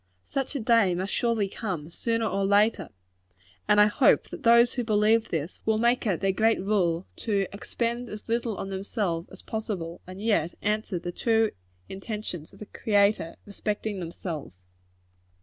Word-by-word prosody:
Such 275 Hz, +2 st, -3 dB
a -, -, 0 dB
day 225 Hz, -6 st, +3 dB
must 185 Hz, +3 st, -3 dB
surely 230 Hz, -4 st, +1 dB
come, 180 Hz, -6 st, -5 dB
sooner 230 Hz, +4 st, -1 dB
or 195 Hz, -2 st, 0 dB
later; 200 Hz, -1 st, +3 dB, 0.8 s
and 210 Hz, -, +5 dB
I 210 Hz, -, +8 dB
hope 210 Hz, +5 st, +3 dB
that -, -, -7 dB
those 235 Hz, +1 st, +6 dB
who 245 Hz, -, -1 dB
believe 220 Hz, +1 st, +3 dB
this, 160 Hz, +1 st, -3 dB
will 220 Hz, -1 st, +2 dB
make 235 Hz, +1 st, +2 dB
it 185 Hz, -5 st, 0 dB
their 195 Hz, -1 st, +2 dB
great 220 Hz, +4 st, +2 dB
rule 185 Hz, -3 st, +1 dB
to 200 Hz, -3 st, 0 dB
expend 235 Hz, +4 st, -3 dB
as 210 Hz, -, -8 dB
little 230 Hz, -2 st, -1 dB
on 195 Hz, -, -5 dB
themselves 190 Hz, -3 st, -2 dB
as -, -, -11 dB
possible, 195 Hz, -7 st, -4 dB
and 185 Hz, +1 st, -9 dB
yet 205 Hz, -6 st, +1 dB
answer 210 Hz, -2 st, 0 dB
the 175 Hz, +1 st, -4 dB
true 225 Hz, +3 st, +2 dB, 0.4 s
intentions 195 Hz, -5 st, -6 dB
of -, -, -16 dB
the 210 Hz, -, -8 dB
Creator 200 Hz, -5 st, +1 dB
respecting 205 Hz, 0 st, -3 dB
themselves. 165 Hz, -, -6 dB
210 Hz, 165 wpm, -27 LUFS, 185-225 Hz, 0.8 s, I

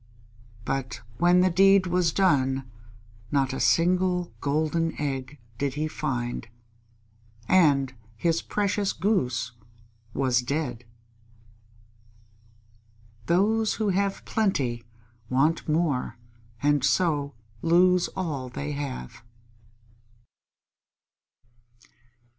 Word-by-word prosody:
But 135 Hz, -2 st, -3 dB, 0.2 s
when 175 Hz, +1 st, +5 dB
the 185 Hz, 0 st, +3 dB
deed 195 Hz, +2 st, +5 dB
was 180 Hz, -2 st, +1 dB
done, 135 Hz, -8 st, +1 dB, 0.6 s
not 135 Hz, -1 st, +1 dB
a -, -, -3 dB
single 180 Hz, +1 st, +2 dB
golden 155 Hz, +3 st, 0 dB
egg 135 Hz, -1 st, -3 dB, 0.2 s
did 140 Hz, -1 st, -1 dB
he 155 Hz, +1 st, -1 dB
find, 120 Hz, -6 st, -3 dB, 1.0 s
and 140 Hz, -8 st, +3 dB, 0.2 s
his 165 Hz, +6 st, +1 dB
precious 205 Hz, -1 st, -1 dB
Goose 125 Hz, -, 0 dB, 0.6 s
was 125 Hz, -1 st, +1 dB
dead. 125 Hz, -3 st, -3 dB, 2.4 s
_Those 215 Hz, +5 st, +2 dB
who 215 Hz, -2 st, 0 dB
have 195 Hz, +1 st, -1 dB
plenty 135 Hz, -, 0 dB, 0.5 s
want 150 Hz, +6 st, +1 dB
more 150 Hz, -7 st, 0 dB, 0.5 s
and 145 Hz, -2 st, +2 dB
so 145 Hz, -2 st, +1 dB, 0.3 s
lose 180 Hz, +2 st, +4 dB
all 150 Hz, -9 st, -3 dB
they 145 Hz, +4 st, -5 dB
have. 140 Hz, -, -6 dB
155 Hz, 85 wpm, -26 LUFS, 135-180 Hz, 2.4 s, when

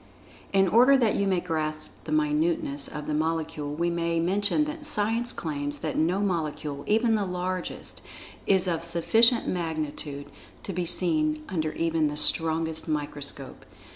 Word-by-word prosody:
In 195 Hz, -1 st, +4 dB
order 250 Hz, +8 st, +6 dB
that 235 Hz, -5 st, +2 dB
you 200 Hz, -, +1 dB
may 185 Hz, -2 st, +2 dB
grasp 155 Hz, -3 st, -4 dB
the 155 Hz, -, -5 dB
minuteness 150 Hz, -1 st, 0 dB
of 150 Hz, -1 st, -6 dB
the 150 Hz, -, -2 dB
Molecule, 155 Hz, -1 st, -2 dB
we 170 Hz, +2 st, 0 dB
may 170 Hz, -1 st, 0 dB
mention 205 Hz, -, +2 dB
that 300 Hz, +1 st, -6 dB
Science[Pg 230 Hz, -4 st, +1 dB
68] 245 Hz, -, -2 dB
claims 145 Hz, -3 st, -3 dB
that 155 Hz, +1 st, -4 dB
no 175 Hz, +5 st, +1 dB
molecule, 155 Hz, -6 st, -2 dB
even 225 Hz, +2 st, +3 dB
the 215 Hz, -2 st, +1 dB
largest, 180 Hz, 0 st, -4 dB, 0.5 s
is 190 Hz, -1 st, +3 dB
of 165 Hz, -2 st, -1 dB
sufficient 225 Hz, +8 st, +3 dB
magnitude 155 Hz, -4 st, -3 dB, 0.4 s
to 195 Hz, -, -5 dB
be 175 Hz, 0 st, -2 dB
seen 155 Hz, -3 st, +1 dB
under 155 Hz, -4 st, -2 dB
even 165 Hz, -2 st, +1 dB
the 150 Hz, 0 st, -4 dB
strongest 160 Hz, +1 st, +1 dB
microscope. 145 Hz, -3 st, -4 dB
165 Hz, 155 wpm, -27 LUFS, 155-190 Hz, 0.5 s, order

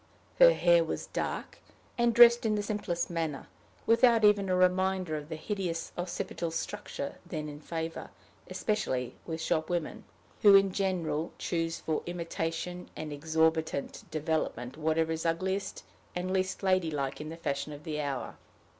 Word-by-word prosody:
Her -, -, +9 dB
hair -, -, +4 dB
was -, -, -4 dB
dark, -, -, -4 dB, 0.4 s
and 240 Hz, -1 st, +3 dB
dressed 235 Hz, +1 st, +8 dB
in 215 Hz, -2 st, +1 dB
the 205 Hz, -, -1 dB
simplest 200 Hz, -5 st, -2 dB
manner, 160 Hz, -5 st, -2 dB, 0.4 s
without 230 Hz, -1 st, +5 dB
even 205 Hz, -2 st, +4 dB
a 185 Hz, -, +3 dB
reminder 185 Hz, -2 st, +2 dB
of 150 Hz, 0 st, -6 dB
the 160 Hz, -, -3 dB
hideous 170 Hz, -1 st, -3 dB
occipital 175 Hz, -1 st, -3 dB
structure 160 Hz, -3 st, -5 dB
then 155 Hz, -4 st, -5 dB
in 145 Hz, 0 st, -8 dB
favor 165 Hz, +1 st, -5 dB, 0.4 s
especially 130 Hz, -, -1 dB
with 160 Hz, -1 st, -3 dB
shop 160 Hz, -1 st, 0 dB
women, 175 Hz, -3 st, -2 dB, 0.4 s
who 205 Hz, -2 st, +8 dB
in 195 Hz, -1 st, +5 dB
general 175 Hz, -5 st, -1 dB
choose 165 Hz, -1 st, -2 dB
for 155 Hz, -1 st, -1 dB
imitation 175 Hz, +1 st, -4 dB
and 155 Hz, -1 st, -5 dB
exorbitant 160 Hz, 0 st, 0 dB
development 155 Hz, -6 st, -2 dB
whatever 160 Hz, +1 st, +1 dB
is 160 Hz, 0 st, -2 dB
ugliest 190 Hz, +4 st, -1 dB, 0.3 s
and 180 Hz, +1 st, -2 dB
least 190 Hz, +1 st, -1 dB
lady 185 Hz, -3 st, +2 dB
like 140 Hz, -2 st, -3 dB
in 155 Hz, -, -6 dB
the 165 Hz, -, -7 dB
fashion 145 Hz, -2 st, -3 dB
of 145 Hz, 0 st, -9 dB
the 150 Hz, -1 st, -3 dB
hour. 140 Hz, -3 st, -4 dB
165 Hz, 155 wpm, -30 LUFS, 155-190 Hz, 0.4 s, Her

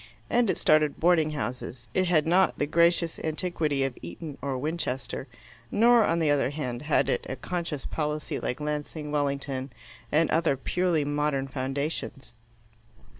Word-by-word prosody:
And 240 Hz, -3 st, +3 dB
it -, -, +1 dB
started 155 Hz, -1 st, +3 dB
boarding 165 Hz, -2 st, +4 dB
houses. 125 Hz, -3 st, -5 dB
It 185 Hz, -1 st, +2 dB
had 160 Hz, -4 st, +3 dB
not 180 Hz, +3 st, +3 dB
the -, -, +1 dB
gracious 170 Hz, +2 st, +2 dB
antiquity 155 Hz, -3 st, -1 dB
of 135 Hz, -2 st, -2 dB
Eton 140 Hz, -, -7 dB
or 135 Hz, -2 st, -2 dB
Winchester, 150 Hz, -3 st, -3 dB, 0.4 s
nor, 230 Hz, -, +5 dB
on 165 Hz, -, +1 dB
the 160 Hz, -3 st, +2 dB
other 145 Hz, -2 st, +2 dB
hand, 125 Hz, -5 st, -4 dB
had 150 Hz, -3 st, +2 dB
it -, -, 0 dB
a 130 Hz, -, -2 dB
conscious 170 Hz, -3 st, -4 dB
policy 150 Hz, -1 st, -2 dB
like 125 Hz, -, -3 dB
Lancing, 150 Hz, 0 st, -4 dB
Wellington, 140 Hz, -2 st, -2 dB, 0.4 s
and 160 Hz, +1 st, +3 dB
other 160 Hz, -4 st, +2 dB
purely 170 Hz, +2 st, 0 dB
modern 145 Hz, -2 st, 0 dB
foundations. 135 Hz, 0 st, -3 dB
150 Hz, 150 wpm, -27 LUFS, 135-165 Hz, 0.4 s, nor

